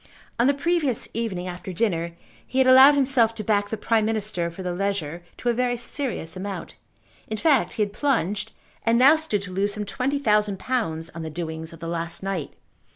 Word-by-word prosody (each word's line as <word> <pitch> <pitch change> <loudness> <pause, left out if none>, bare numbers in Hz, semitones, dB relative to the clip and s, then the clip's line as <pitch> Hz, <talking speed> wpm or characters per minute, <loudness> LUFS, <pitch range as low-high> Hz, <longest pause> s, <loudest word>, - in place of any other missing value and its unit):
On 240 - +4
the 280 - +3
previous 290 -4 0
evening, 210 -6 -3
after 180 +1 -6
dinner, 170 -4 -1 0.3
he 260 - -5
had 265 - +5
allowed 260 +3 +8
himself 255 -5 +3
to 215 - -5
back 205 -1 +1
the 220 - -3
Prime 220 +1 +1
Minister 210 -6 -1
for 170 +3 -8
the 180 -1 -2
Leger 175 -4 -2
to 245 - -1
a - - +3
very 245 0 0
serious 235 - -4
amount. 195 +1 -6 0.5
In 220 - -3
fact 290 -1 +2
he 215 - +2
had 205 -1 -4
plunged, 210 - 0 0.3
and 230 0 +3
now 270 +5 +7
stood 265 -11 0
to 185 - -7
lose 200 +2 0
some 210 -1 -3
twenty 260 +7 -1
thousand 210 -6 +2
pounds 175 -9 -2
on 165 - -7
the 160 - -5
doings 160 0 -5
of 165 -2 -13
the 165 - -5
last 170 +1 -3
night. 190 -6 -3
210 Hz, 205 wpm, -24 LUFS, 180-250 Hz, 0.5 s, allowed